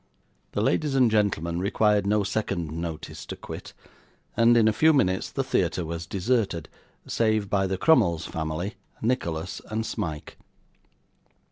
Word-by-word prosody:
The -, -, 0 dB
ladies 150 Hz, -3 st, +1 dB
and 125 Hz, -4 st, +4 dB
gentlemen 90 Hz, -6 st, +1 dB
required 105 Hz, +1 st, +2 dB
no 105 Hz, 0 st, +2 dB
second 100 Hz, -5 st, -2 dB
notice 80 Hz, -2 st, -5 dB
to -, -, -5 dB
quit; -, -, -9 dB, 0.6 s
and, 115 Hz, +1 st, +5 dB
in 110 Hz, -2 st, +5 dB
a 110 Hz, -, +3 dB
few 160 Hz, +8 st, +5 dB
minutes, 95 Hz, -10 st, +1 dB
the -, -, -1 dB
theatre 90 Hz, -, 0 dB
was 85 Hz, +1 st, -5 dB
deserted, 100 Hz, -4 st, 0 dB, 0.4 s
save 110 Hz, -3 st, 0 dB
by 95 Hz, -1 st, +2 dB
the 95 Hz, 0 st, -2 dB
Crummles 85 Hz, -, +3 dB
family, 80 Hz, +6 st, -4 dB, 0.3 s
Nicholas, 85 Hz, -10 st, -1 dB
and 110 Hz, +1 st, -2 dB
Smike. 75 Hz, -7 st, -5 dB
100 Hz, 140 wpm, -26 LUFS, 85-110 Hz, 0.6 s, and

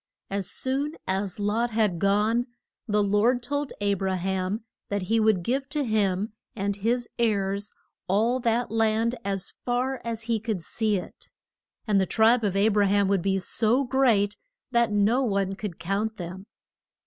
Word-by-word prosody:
As 195 Hz, -1 st, -1 dB
soon 275 Hz, +6 st, +1 dB
as 190 Hz, +1 st, -2 dB
Lot 215 Hz, +4 st, 0 dB
had 215 Hz, -6 st, +1 dB
gone, 210 Hz, +5 st, +2 dB, 0.4 s
the 210 Hz, -1 st, +2 dB
Lord 215 Hz, +5 st, +2 dB
told 285 Hz, +2 st, -2 dB
A 205 Hz, 0 st, +1 dB
bra 190 Hz, -1 st, -1 dB
ham 190 Hz, +3 st, -2 dB, 0.3 s
that 200 Hz, -2 st, -1 dB
he 225 Hz, +5 st, +1 dB
would 215 Hz, -5 st, +3 dB
give 270 Hz, +6 st, -1 dB
to 295 Hz, -1 st, 0 dB
him 210 Hz, -3 st, 0 dB, 0.2 s
and 200 Hz, -1 st, -2 dB
his 235 Hz, +4 st, 0 dB
heirs 200 Hz, -2 st, 0 dB, 0.4 s
all 225 Hz, +7 st, +2 dB
that 235 Hz, -1 st, 0 dB
land 225 Hz, +1 st, +2 dB
as 195 Hz, -1 st, -3 dB
far 255 Hz, +2 st, -1 dB
as 230 Hz, -1 st, -3 dB
he 230 Hz, -1 st, 0 dB
could 210 Hz, -5 st, -3 dB
see 215 Hz, +3 st, 0 dB
it. 180 Hz, -, -9 dB, 0.6 s
And 205 Hz, -3 st, +3 dB
the 190 Hz, -, 0 dB
tribe 225 Hz, +4 st, +4 dB
of 200 Hz, -2 st, 0 dB
A 200 Hz, +2 st, +4 dB
bra 205 Hz, -1 st, +3 dB
ham 200 Hz, 0 st, +3 dB
would 200 Hz, -2 st, +2 dB
be 195 Hz, +1 st, +1 dB
so 225 Hz, +7 st, +1 dB
great 240 Hz, -6 st, +2 dB, 0.3 s
that 235 Hz, -2 st, +3 dB
no 210 Hz, +5 st, +3 dB
one 200 Hz, -5 st, 0 dB
could 195 Hz, -3 st, -6 dB
count 205 Hz, +5 st, -2 dB
them. 185 Hz, +3 st, -7 dB
210 Hz, 170 wpm, -26 LUFS, 195-235 Hz, 0.6 s, tribe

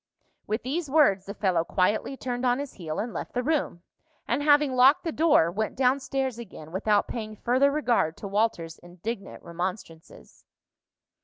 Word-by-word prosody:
With 215 Hz, +3 st, -2 dB
these 295 Hz, +5 st, -3 dB
words 210 Hz, -11 st, +3 dB
the 200 Hz, -, -6 dB
fellow 180 Hz, -5 st, +1 dB
quietly 205 Hz, +9 st, 0 dB
turned 245 Hz, -1 st, -4 dB
on 245 Hz, -1 st, +2 dB
his 285 Hz, -1 st, -6 dB
heel 160 Hz, -4 st, -6 dB
and 225 Hz, +3 st, -3 dB
left -, -, -6 dB
the 250 Hz, -, -1 dB
room, 280 Hz, -, -1 dB, 0.4 s
and -, -, 0 dB
having 290 Hz, -2 st, +4 dB
locked 255 Hz, +3 st, +5 dB
the 330 Hz, -, -2 dB
door, 300 Hz, -, +3 dB
went 215 Hz, +4 st, -3 dB
down 260 Hz, +1 st, +2 dB
stairs 265 Hz, -3 st, -3 dB
again 175 Hz, -8 st, -10 dB
without 205 Hz, +3 st, +1 dB
paying 215 Hz, -2 st, -6 dB
further 255 Hz, +6 st, +2 dB
regard 245 Hz, -, 0 dB
to 200 Hz, -, -7 dB
Walter's 195 Hz, -5 st, -1 dB
indignant 195 Hz, +5 st, -7 dB
remonstrances. 170 Hz, -1 st, -7 dB
230 Hz, 165 wpm, -26 LUFS, 185-270 Hz, 0.4 s, locked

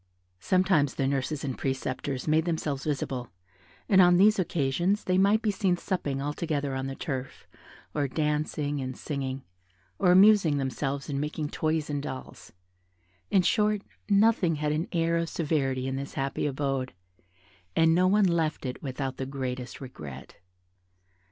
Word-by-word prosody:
Sometimes 185 Hz, -, +2 dB
the 135 Hz, -, 0 dB
nurses 140 Hz, +1 st, -1 dB
and 135 Hz, -3 st, -2 dB
preceptors 130 Hz, +1 st, -3 dB
made 155 Hz, +1 st, +3 dB
themselves 155 Hz, -5 st, -2 dB
visible, 135 Hz, -4 st, -2 dB, 0.6 s
and 190 Hz, -2 st, +6 dB
on 175 Hz, -1 st, +6 dB
these 210 Hz, +2 st, +5 dB
occasions 175 Hz, +4 st, 0 dB
they 185 Hz, 0 st, +2 dB
might 205 Hz, +3 st, +3 dB
be 215 Hz, -, +2 dB
seen 190 Hz, -3 st, +1 dB
supping 145 Hz, -8 st, -2 dB
all 145 Hz, +2 st, -2 dB
together 145 Hz, -4 st, -2 dB
on 130 Hz, 0 st, -2 dB
the 135 Hz, -, -5 dB
turf, 135 Hz, -4 st, -5 dB, 0.5 s
or 145 Hz, -2 st, 0 dB
dancing 150 Hz, 0 st, -1 dB
and 130 Hz, -1 st, -5 dB
singing, 135 Hz, -2 st, -4 dB, 0.6 s
or 180 Hz, -, +4 dB
amusing 190 Hz, -5 st, +6 dB
themselves 135 Hz, +1 st, -2 dB
in 140 Hz, -2 st, -2 dB
making 150 Hz, 0 st, -3 dB
toys 155 Hz, 0 st, -1 dB
and 145 Hz, -1 st, -2 dB
dolls; 130 Hz, -2 st, -8 dB, 0.8 s
in 195 Hz, -3 st, +4 dB
short, 210 Hz, +1 st, +2 dB, 0.3 s
nothing 200 Hz, -5 st, +4 dB
had 150 Hz, 0 st, -1 dB
an 155 Hz, +4 st, -1 dB
air 170 Hz, -1 st, +1 dB
of 165 Hz, 0 st, -1 dB
severity 135 Hz, -5 st, -1 dB
in 135 Hz, 0 st, -2 dB
this 140 Hz, +1 st, -6 dB
happy 135 Hz, +2 st, -1 dB
abode, 135 Hz, -2 st, -2 dB, 0.8 s
and 165 Hz, 0 st, +5 dB
no 180 Hz, +2 st, +4 dB
one 205 Hz, +2 st, +4 dB
left 165 Hz, -5 st, 0 dB
it 125 Hz, 0 st, -4 dB
without 135 Hz, -1 st, -4 dB
the 130 Hz, -, -4 dB
greatest 130 Hz, -2 st, -5 dB
regret. 75 Hz, -, -9 dB
150 Hz, 155 wpm, -28 LUFS, 135-175 Hz, 0.8 s, and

